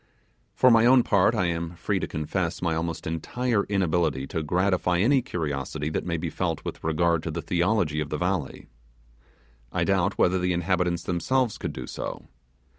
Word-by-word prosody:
For 130 - +5
my 115 0 +6
own 130 -1 +6
part, 100 -5 +3
I 90 - +1
am 85 0 -2
free 85 - -1
to - - -3
confess 85 +3 -2
my 85 -2 0
almost 80 0 -3
entire 105 +7 -1
inability 85 -8 0
to 80 - -2
gratify 90 +2 +1
any 130 +9 +3
curiosity 75 - -3
that - - -3
may 85 -1 -1
be 80 0 -4
felt 85 -4 -2
with - - -6
regard 85 +1 +1
to - - -4
the - - -4
theology 85 -3 +1
of 75 -1 -3
the 75 - -2
valley. 90 -5 -2 1.1
I - - 0
doubt 95 0 +1
whether 90 +1 +3
the 90 0 +1
inhabitants 90 0 0
themselves 115 +7 0
could - - -3
do - - -6
so. - - -6
85 Hz, 180 wpm, -26 LUFS, 80-95 Hz, 1.1 s, my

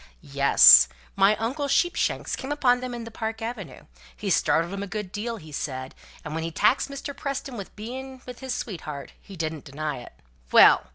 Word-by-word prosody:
"Yes. - - +8 0.3
My 195 +2 +4
uncle 265 +7 -2
Sheepshanks 350 +6 0
came 265 - -6
upon 250 -4 +2
them 250 -1 -5
in 235 - -6
the 230 - -9
Park 220 0 -4
Avenue, 225 - -7 0.3
he - - -3
startled 170 +3 +2
'em 200 - -4
a 200 - -4
good 210 -2 -5
deal, 225 +3 -4
he 155 -5 -13
said; 130 -2 -5 0.3
and 150 - -5
when 160 0 -3
he 165 - -2
taxed 210 - +2
Mr. 280 0 -7
Preston 275 -2 -5
with 200 -4 -8
being 260 +4 -8
with 250 -2 -9
his 265 -1 -6
sweetheart, 155 - -6
he 195 - -12
didn't 160 -3 -4
deny 150 0 -4
it." 120 - -12 0.4
"Well! - - +7
215 Hz, 190 wpm, -25 LUFS, 160-250 Hz, 0.4 s, Yes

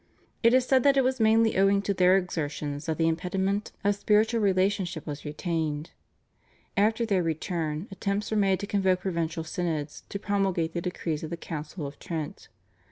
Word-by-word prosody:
It 230 +1 +5
is 255 -1 +4
said 260 0 +4
that 275 +1 +4
it 270 - +5
was 260 0 0
mainly 225 0 +4
owing 200 +1 +4
to 200 - 0
their 185 0 +5
exertions 150 -5 -3
that 160 - -1
the 165 -1 +2
impediment 190 +5 -1
of 205 +1 +3
spiritual 215 +3 +2
relationship 190 -4 +1
was 145 -1 -6
retained. 155 -1 -2 0.8
After 220 +3 +2
their 200 -5 +2
return 165 0 -2
attempts 200 +2 -2
were 215 - +1
made 195 -2 +3
to - - -2
convoke 190 -3 +1
provincial 170 -3 -2
synods 160 -3 -3
to - - -3
promulgate 195 -5 0
the 170 - -2
decrees 165 -3 -3
of 160 - -4
the 170 - -4
Council 155 0 -6
of 140 +1 -8
Trent. 160 -3 -5
185 Hz, 175 wpm, -27 LUFS, 160-205 Hz, 0.8 s, It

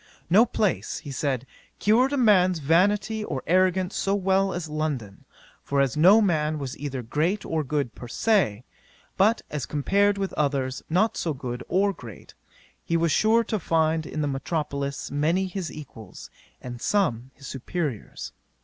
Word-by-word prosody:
No 220 +7 +6
place, 210 -5 -1
(he 145 - -8
said,) 135 -2 -2 0.3
cured 240 +6 +3
a 285 - 0
man's 185 -7 +4
vanity 200 +8 +2
or 135 -10 -4
arrogance 185 +1 +2
so 195 0 0
well 195 0 +2
as 175 -2 -4
London; 150 -10 -4 0.4
for 140 - -1
as 135 -3 +2
no 185 +8 +7
man 155 -6 +1
was 135 -3 -5
either 135 -3 -4
great 160 - -1
or 160 -1 -1
good 140 -4 -2
per 120 - -10
se, 125 - +1 0.5
but 215 +4 +3
as 150 -4 -3
compared 200 +7 +2
with 195 -1 -3
others 135 -3 -1
not 190 +7 +2
so 160 -4 -2
good 125 -1 -5
or 200 +2 +2
great, 115 - -12 0.5
he 165 - 0
was 165 -1 +1
sure 225 +6 +3
to 215 -2 -2
find 160 -2 +1
in 155 - -4
the 145 - 0
metropolis 140 0 -3
many 160 +7 +1
his 185 -2 -5
equals, 115 -9 -11 0.3
and 120 -1 -7
some 130 - 0
his 140 - -14
superiours. 135 - -4
160 Hz, 160 wpm, -25 LUFS, 140-195 Hz, 0.5 s, no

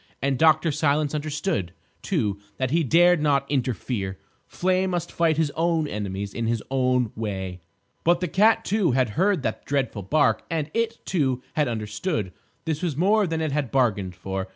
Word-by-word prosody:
And 135 -2 0
Dr. 160 0 +4
Silence 150 0 +1
understood, 150 - -2 0.3
too, 100 -2 -1 0.2
that 130 -1 -1
he 165 +1 +2
dared 175 +3 +4
not 140 -2 +2
interfere. 120 -7 -2 0.3
Flame 185 +1 0
must 175 -2 -2
fight 165 -2 +1
his 160 -3 +1
own 165 0 0
enemies 100 -3 -4
in 115 -1 -2
his 115 -2 -1
own 125 -3 +1
way. 95 -4 -4 0.4
But 175 +1 +3
the 180 - -1
cat, 215 +7 +3
too, 195 - +1
had 130 -2 +2
heard 185 - +1
that - - -3
dreadful 135 -7 -1
bark; 145 +11 +2
and 155 -2 -2
it, 230 0 -2
too, 130 -8 0
had 150 -3 +1
understood. 105 - -3 0.3
This 160 -2 -2
was 165 -6 -2
more 205 +4 +3
than 160 -1 -2
it 155 -2 -1
had 140 -3 -1
bargained 105 -9 +1
for. 95 +1 -4
145 Hz, 175 wpm, -24 LUFS, 115-165 Hz, 0.4 s, Dr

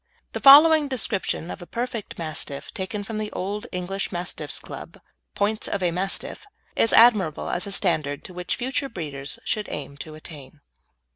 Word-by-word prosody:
The - - -3
following 300 +2 +8
description 220 -9 -1
of - - -8
a 175 - -9
perfect 235 -3 -4
Mastiff, 155 -4 -4
taken 200 +2 -4
from 215 +1 -5
the 215 -1 -3
Old 205 +3 -4
English 185 +2 -3
Mastiff 175 -4 -3
Club's - - -9 0.4
Points 215 +2 0
of 200 -2 -2
a 175 - +2
Mastiff, 195 - -3 0.3
is 225 - +3
admirable 210 -9 +5
as 180 +3 -2
a - - -5
standard 155 -8 0
to 185 - -10
which 180 0 -2
future 270 +2 -1
breeders 145 - -5
should 210 -2 -1
aim 140 -1 -6
to 155 +1 -8
attain. 155 -2 -10
190 Hz, 165 wpm, -24 LUFS, 160-220 Hz, 0.4 s, following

